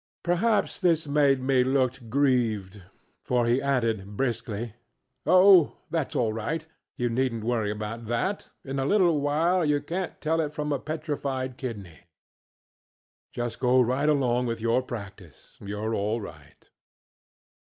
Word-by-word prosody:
ŌĆØ -, -, -78 dB
Perhaps 195 Hz, +6 st, +1 dB
this 170 Hz, -4 st, +2 dB
made 140 Hz, -2 st, +2 dB
me 130 Hz, -1 st, +3 dB
look 130 Hz, -2 st, 0 dB
grieved, 115 Hz, -7 st, +1 dB, 0.4 s
for 125 Hz, -1 st, +1 dB
he 120 Hz, +3 st, +2 dB
added, 115 Hz, -7 st, -1 dB
briskly: 115 Hz, -3 st, -2 dB, 0.5 s
ŌĆ£Oh, 185 Hz, -1 st, +7 dB, 0.2 s
thatŌĆÖs 160 Hz, -4 st, -2 dB
all 115 Hz, -3 st, +1 dB
right, 150 Hz, +9 st, -3 dB, 0.3 s
you 120 Hz, -, 0 dB
neednŌĆÖt 120 Hz, -1 st, -1 dB
worry 115 Hz, -3 st, 0 dB
about 105 Hz, +2 st, -5 dB
that; 120 Hz, -, -2 dB, 0.2 s
in 135 Hz, 0 st, -3 dB
a 135 Hz, -, 0 dB
little 175 Hz, -4 st, +3 dB
while 165 Hz, +5 st, +2 dB
you 150 Hz, -1 st, +2 dB
canŌĆÖt 180 Hz, +4 st, -4 dB
tell 160 Hz, +1 st, +1 dB
it 150 Hz, -1 st, -3 dB
from 150 Hz, 0 st, -3 dB
a 140 Hz, -, -1 dB
petrified 145 Hz, -5 st, -3 dB
kidney. 105 Hz, -, -7 dB, 1.3 s
Just 120 Hz, -1 st, -4 dB
go 125 Hz, 0 st, +4 dB
right 130 Hz, +5 st, +2 dB
along 125 Hz, -4 st, +2 dB
with 115 Hz, -1 st, -3 dB
your 115 Hz, +3 st, +2 dB
practice; 100 Hz, -, -10 dB
youŌĆÖre 105 Hz, +2 st, -3 dB
all 105 Hz, +3 st, -1 dB
right. 100 Hz, -, -12 dB
130 Hz, 140 wpm, -26 LUFS, 115-150 Hz, 1.3 s, ŌĆ£Oh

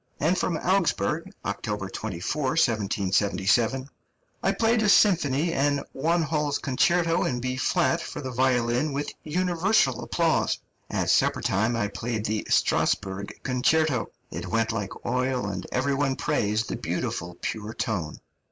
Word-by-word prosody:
And 165 Hz, +5 st, +2 dB
from 175 Hz, -2 st, 0 dB
Augsburg 180 Hz, -2 st, 0 dB
(October 105 Hz, -3 st, -3 dB
24, 100 Hz, -, -4 dB
1777): 105 Hz, -, +1 dB, 0.5 s
"I 195 Hz, -, +2 dB
played 225 Hz, +3 st, +2 dB
a 210 Hz, -, +3 dB
symphony 165 Hz, -6 st, +4 dB
and 145 Hz, -1 st, +1 dB
Wanhall's 155 Hz, -1 st, 0 dB
Concerto 165 Hz, +5 st, +2 dB
in 125 Hz, -, -1 dB
B 130 Hz, +1 st, -2 dB
flat 170 Hz, +5 st, +1 dB
for -, -, -6 dB
the 130 Hz, -2 st, -5 dB
violin 125 Hz, +2 st, +1 dB
with 145 Hz, +1 st, -2 dB
universal 175 Hz, -, +1 dB
applause. -, -, +1 dB, 0.3 s
At -, -, 0 dB
supper -, -, +2 dB
time 110 Hz, +5 st, +1 dB
I 105 Hz, -3 st, 0 dB
played 110 Hz, 0 st, -3 dB
the 110 Hz, 0 st, -2 dB
Strasburg 100 Hz, 0 st, 0 dB
Concerto. 135 Hz, +1 st, +1 dB, 0.2 s
It -, -, -5 dB
went 115 Hz, 0 st, +1 dB
like 105 Hz, -4 st, -5 dB
oil, 125 Hz, -2 st, 0 dB
and 95 Hz, -2 st, -4 dB
every 140 Hz, +2 st, +1 dB
one 135 Hz, -1 st, +1 dB
praised 105 Hz, -2 st, 0 dB
the -, -, -3 dB
beautiful, 85 Hz, 0 st, -3 dB
pure 110 Hz, 0 st, -4 dB
tone." 95 Hz, -, -2 dB
130 Hz, 135 wpm, -26 LUFS, 110-160 Hz, 0.5 s, symphony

